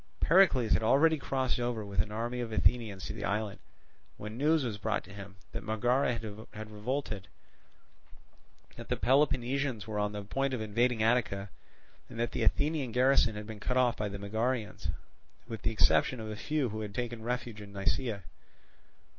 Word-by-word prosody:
Pericles 150 - +5
had - - +3
already 150 +7 +4
crossed 130 -2 -1
over 120 -3 -1
with 100 -3 0
an 105 - -5
army 120 +3 -2
of 120 -2 -3
Athenians 110 -4 +1
to - - -4
the 105 -2 -6
island, 105 0 -1 0.6
when 105 +1 -7
news 150 +4 +3
was 105 -4 -3
brought 110 +1 -1
to 100 - -13
him 100 -1 -9 0.2
that 115 - -4
Megara 120 +4 +2
had 110 -1 -8
revolted, 105 -3 -3 1.5
that - - -9
the - - +2
Peloponnesians 130 -4 +2
were 105 -2 -3
on 105 0 0
the 105 -1 -5
point 135 +6 -1
of - - -4
invading 110 +2 +1
Attica, 105 -4 +1 0.6
and 115 - -8
that 120 0 0
the - - -3
Athenian 145 -4 +1
garrison 125 -3 +4
had 105 0 -5
been 110 -1 -8
cut 125 +5 -1
off 125 -2 +4
by 105 -1 -2
the 100 - -5
Megarians, 110 +3 -2 0.6
with 115 -3 -6
the - - +1
exception 115 +3 +3
of 110 -1 -5
a - - -4
few 145 +3 -1
who 110 +1 -4
had 105 -2 -6
taken 120 -2 -3
refuge 120 -2 -3
in 100 -1 -10
Nisaea. 100 +2 -1
115 Hz, 180 wpm, -31 LUFS, 105-125 Hz, 1.5 s, Pericles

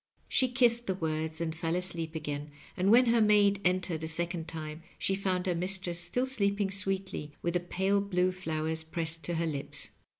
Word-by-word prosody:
She 260 - +3
kissed 240 -1 +3
the 190 - +1
words 160 -2 -2
and 160 -1 -2
fell 165 +1 -1
asleep 170 -3 -2
again, 150 -1 -4 0.3
and 185 +2 +2
when 245 +4 +7
her 230 -1 +4
maid 205 -2 +5
entered 180 -3 +1
a - - -1
second 170 +1 -1
time 155 0 -5 0.2
she 195 - 0
found 190 -2 0
her 180 - +1
mistress 180 0 -1
still 175 +9 0
sleeping 200 -6 0
sweetly, 195 -6 -2
with 170 - 0
the 175 - +2
pale 190 +3 +1
blue 185 -2 +1
flowers 160 -3 -3
pressed 165 0 -2
to 175 - -1
her 165 +1 0
lips. 145 -4 -3
180 Hz, 190 wpm, -31 LUFS, 160-195 Hz, 0.3 s, when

